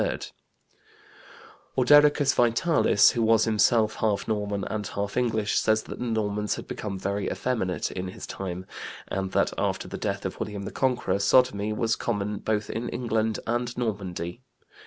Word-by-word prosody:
Ordericus 145 Hz, +1 st, +5 dB
Vitalis, 120 Hz, -1 st, +4 dB
who 120 Hz, -, -1 dB
was 115 Hz, 0 st, +4 dB
himself 110 Hz, 0 st, +3 dB
half 105 Hz, -2 st, 0 dB
Norman 105 Hz, -2 st, -1 dB
and 105 Hz, 0 st, -3 dB
half 100 Hz, 0 st, -4 dB
English, 110 Hz, -4 st, +1 dB
says 110 Hz, 0 st, +2 dB
that -, -, -8 dB
the 125 Hz, -, -3 dB
Normans 105 Hz, -2 st, -1 dB
had -, -, -8 dB
become 100 Hz, -3 st, -5 dB
very 100 Hz, +2 st, -2 dB
effeminate 110 Hz, -8 st, -2 dB
in 95 Hz, 0 st, -4 dB
his 90 Hz, -, -8 dB
time, 95 Hz, -1 st, -5 dB, 0.4 s
and 95 Hz, 0 st, -2 dB
that -, -, +2 dB
after -, -, -1 dB
the -, -, -6 dB
death -, -, -3 dB
of -, -, -4 dB
William 105 Hz, -1 st, -4 dB
the -, -, -5 dB
Conqueror 125 Hz, -6 st, 0 dB
sodomy 105 Hz, -1 st, +3 dB
was 110 Hz, +1 st, 0 dB
common 105 Hz, -2 st, -2 dB
both 105 Hz, -1 st, -1 dB
in 115 Hz, +2 st, -3 dB
England 110 Hz, -2 st, -1 dB
and 120 Hz, +1 st, -2 dB
Normandy. 100 Hz, -4 st, -3 dB
110 Hz, 155 wpm, -26 LUFS, 100-120 Hz, 0.4 s, Ordericus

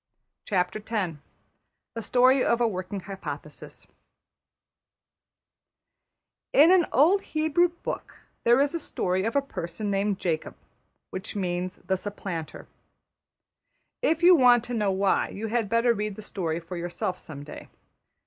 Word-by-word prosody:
\chapter{The 190 Hz, -3 st, -2 dB, 0.8 s
Story 255 Hz, +3 st, +4 dB
of 235 Hz, -, +2 dB
a 240 Hz, -, +3 dB
Working 185 Hz, -1 st, -4 dB
Hypothesis} 195 Hz, 0 st, -8 dB, 2.7 s
In 310 Hz, +5 st, +7 dB
an 365 Hz, -3 st, +5 dB
old 345 Hz, +9 st, +4 dB
Hebrew 315 Hz, +1 st, +2 dB
book 345 Hz, 0 st, -7 dB, 0.2 s
there 240 Hz, +2 st, +5 dB
is 285 Hz, +2 st, +2 dB
a 335 Hz, -, -1 dB
story 190 Hz, -, -1 dB
of 225 Hz, -, -2 dB
a 280 Hz, -, +3 dB
person 205 Hz, -4 st, -5 dB
named 200 Hz, 0 st, 0 dB
Jacob, 165 Hz, -4 st, -2 dB, 0.6 s
which 190 Hz, +3 st, -5 dB
means 180 Hz, -2 st, -2 dB
the 190 Hz, -, +1 dB
Supplanter. 185 Hz, -5 st, -6 dB, 1.3 s
If 325 Hz, +2 st, +1 dB
you 360 Hz, +1 st, +9 dB
want 245 Hz, -5 st, +5 dB
to 245 Hz, -, -6 dB
know 210 Hz, -4 st, +1 dB
why, 195 Hz, +1 st, +1 dB
you 220 Hz, +2 st, -5 dB
had 225 Hz, -2 st, 0 dB
better 230 Hz, +1 st, +3 dB
read 210 Hz, -2 st, -3 dB
the 215 Hz, -, -9 dB
story 170 Hz, -6 st, -3 dB
for 175 Hz, +2 st, -8 dB
yourself 175 Hz, +1 st, -3 dB
some 145 Hz, -2 st, -9 dB
day. 150 Hz, -, -10 dB
210 Hz, 130 wpm, -26 LUFS, 185-250 Hz, 2.7 s, you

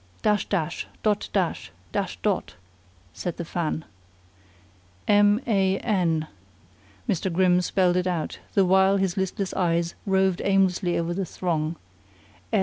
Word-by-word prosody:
"Dash 210 Hz, -2 st, +2 dB
dash! 175 Hz, -4 st, -1 dB, 0.2 s
Dot 210 Hz, -2 st, +1 dB
dash! 180 Hz, -, -1 dB, 0.2 s
Dash -, -, -2 dB
dot!" -, -, -1 dB, 0.6 s
said 175 Hz, -, -4 dB
the 170 Hz, -, -4 dB
fan. 160 Hz, -1 st, -2 dB, 1.2 s
"M 205 Hz, +1 st, +5 dB
a 195 Hz, -4 st, +2 dB
n," 170 Hz, -8 st, 0 dB, 0.8 s
Mr. 185 Hz, +1 st, 0 dB
Grimm 180 Hz, +1 st, +3 dB
spelled 180 Hz, -1 st, +2 dB
it 180 Hz, 0 st, 0 dB
out, 170 Hz, -4 st, -2 dB, 0.2 s
the 195 Hz, -, +5 dB
while 190 Hz, +1 st, +4 dB
his 190 Hz, -2 st, 0 dB
listless 190 Hz, +1 st, -2 dB
eyes 170 Hz, -1 st, +1 dB
roved 190 Hz, -1 st, +2 dB
aimlessly 190 Hz, -2 st, +2 dB
over 170 Hz, +1 st, -1 dB
the 195 Hz, +2 st, -2 dB
throng. 165 Hz, -2 st, -2 dB
185 Hz, 130 wpm, -25 LUFS, 170-195 Hz, 1.2 s, M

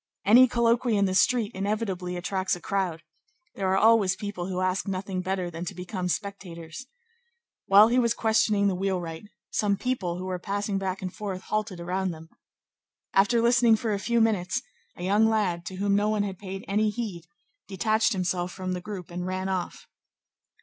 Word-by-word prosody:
Any 245 Hz, +6 st, +8 dB
colloquy 235 Hz, -1 st, +2 dB
in 200 Hz, -, +3 dB
the 185 Hz, -, 0 dB
street 225 Hz, +2 st, +2 dB
inevitably 190 Hz, -3 st, -2 dB
attracts 185 Hz, +1 st, -1 dB
a -, -, -9 dB
crowd. 175 Hz, -3 st, -2 dB, 0.5 s
There 195 Hz, -, -2 dB
are 190 Hz, +1 st, +2 dB
always 220 Hz, -3 st, +4 dB
people 205 Hz, -4 st, -5 dB
who 185 Hz, -1 st, -3 dB
ask 185 Hz, +1 st, 0 dB
nothing 190 Hz, -1 st, -3 dB
better 185 Hz, -1 st, -2 dB
than 165 Hz, +1 st, -6 dB
to -, -, -6 dB
become 180 Hz, +1 st, -4 dB
spectators. 180 Hz, +1 st, -5 dB, 0.8 s
While 205 Hz, +3 st, +7 dB
he 245 Hz, +2 st, +3 dB
was 235 Hz, -2 st, +2 dB
questioning 215 Hz, -2 st, +2 dB
the 195 Hz, -, +1 dB
wheelwright, 180 Hz, -2 st, -3 dB, 0.3 s
some 200 Hz, -2 st, +1 dB
people 195 Hz, -8 st, -2 dB
who 185 Hz, -, -5 dB
were 185 Hz, -1 st, -3 dB
passing 200 Hz, +1 st, -2 dB
back 190 Hz, 0 st, -3 dB
and 185 Hz, -, -4 dB
forth 200 Hz, -4 st, -5 dB
halted 215 Hz, -4 st, -2 dB
around 185 Hz, +2 st, -2 dB
them. 160 Hz, -1 st, -9 dB, 0.8 s
After 230 Hz, +4 st, +3 dB
listening 235 Hz, -1 st, +5 dB
for 220 Hz, 0 st, -2 dB
a 200 Hz, -, -1 dB
few 235 Hz, +3 st, +1 dB
minutes, 195 Hz, -5 st, +1 dB, 0.3 s
a 175 Hz, -, -8 dB
young 205 Hz, +4 st, +3 dB
lad, 185 Hz, -6 st, 0 dB
to 190 Hz, -, -6 dB
whom 200 Hz, +1 st, +1 dB
no 205 Hz, +1 st, +2 dB
one 215 Hz, -1 st, +1 dB
had 195 Hz, -2 st, -5 dB
paid 195 Hz, 0 st, -7 dB
any 210 Hz, +2 st, +2 dB
heed, 205 Hz, -7 st, -5 dB, 0.4 s
detached 215 Hz, +4 st, +1 dB
himself 180 Hz, -1 st, -1 dB
from 185 Hz, 0 st, -5 dB
the 180 Hz, -1 st, -3 dB
group 185 Hz, -3 st, -7 dB
and 180 Hz, +1 st, -4 dB
ran 185 Hz, +1 st, -2 dB
off. 185 Hz, -2 st, -3 dB
195 Hz, 185 wpm, -26 LUFS, 180-215 Hz, 0.8 s, Any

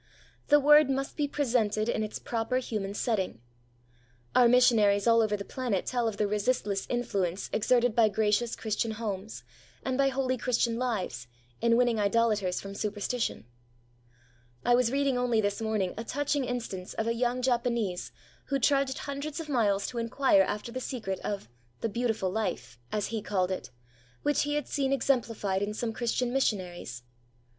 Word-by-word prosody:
The 295 Hz, -, +6 dB
Word 295 Hz, 0 st, +6 dB
must 270 Hz, 0 st, -2 dB
be 295 Hz, -2 st, 0 dB
presented 230 Hz, -7 st, 0 dB
in 220 Hz, -, 0 dB
its 215 Hz, -1 st, -3 dB
proper 230 Hz, +2 st, -2 dB
human 210 Hz, -6 st, -3 dB
setting. 205 Hz, -, -1 dB, 1.0 s
Our 245 Hz, -1 st, +7 dB
missionaries 225 Hz, -5 st, +4 dB
all 230 Hz, -1 st, +5 dB
over 210 Hz, -1 st, +1 dB
the 200 Hz, -, -6 dB
planet 245 Hz, -8 st, -2 dB
tell 240 Hz, -2 st, 0 dB
of 215 Hz, -2 st, -3 dB
the 210 Hz, -, +1 dB
resistless 205 Hz, -1 st, 0 dB
influence 200 Hz, -7 st, -1 dB
exerted 240 Hz, +1 st, +2 dB
by 225 Hz, -3 st, +5 dB
gracious 215 Hz, +3 st, +1 dB
Christian 220 Hz, 0 st, -2 dB
homes, 210 Hz, -2 st, -5 dB, 0.4 s
and 260 Hz, 0 st, -1 dB
by 275 Hz, -, +4 dB
holy 260 Hz, -1 st, -1 dB
Christian 235 Hz, -2 st, +1 dB
lives, 190 Hz, -, -2 dB, 0.3 s
in 230 Hz, 0 st, +4 dB
winning 240 Hz, -3 st, +2 dB
idolators 210 Hz, -3 st, +1 dB
from 195 Hz, 0 st, -7 dB
superstition. 210 Hz, -, -2 dB, 1.2 s
I 245 Hz, -, +4 dB
was 245 Hz, -1 st, +3 dB
reading 275 Hz, -2 st, +1 dB
only 245 Hz, -2 st, +2 dB
this 205 Hz, +1 st, 0 dB
morning 215 Hz, -4 st, 0 dB
a -, -, -3 dB
touching 285 Hz, +2 st, -1 dB
instance 230 Hz, -7 st, -5 dB
of 220 Hz, -, -1 dB
a 230 Hz, -, +1 dB
young 245 Hz, +1 st, -1 dB
Japanese 235 Hz, -7 st, 0 dB, 0.3 s
who 275 Hz, -, 0 dB
trudged 275 Hz, 0 st, +2 dB
hundreds 285 Hz, +2 st, -5 dB
of 320 Hz, -2 st, -6 dB
miles 205 Hz, -7 st, +2 dB
to 240 Hz, -, -4 dB
inquire 230 Hz, -2 st, +3 dB
after 210 Hz, +4 st, -2 dB
the 255 Hz, +2 st, -4 dB
secret 220 Hz, -8 st, -4 dB
of 200 Hz, -, -4 dB, 0.3 s
'the 225 Hz, -, 0 dB
beautiful 220 Hz, -4 st, -1 dB
life' 200 Hz, -, -3 dB
as 210 Hz, -1 st, -1 dB
he 220 Hz, -, -1 dB
called 190 Hz, -3 st, 0 dB
it 185 Hz, -, -4 dB, 0.5 s
which 290 Hz, -1 st, +2 dB
he 290 Hz, 0 st, -1 dB
had 295 Hz, -, -2 dB
seen 275 Hz, -2 st, 0 dB
exemplified 230 Hz, -7 st, 0 dB
in 210 Hz, +1 st, -2 dB
some 225 Hz, 0 st, -2 dB
Christian 240 Hz, +1 st, -1 dB
missionaries. 180 Hz, -, -2 dB
230 Hz, 165 wpm, -29 LUFS, 205-255 Hz, 1.2 s, Our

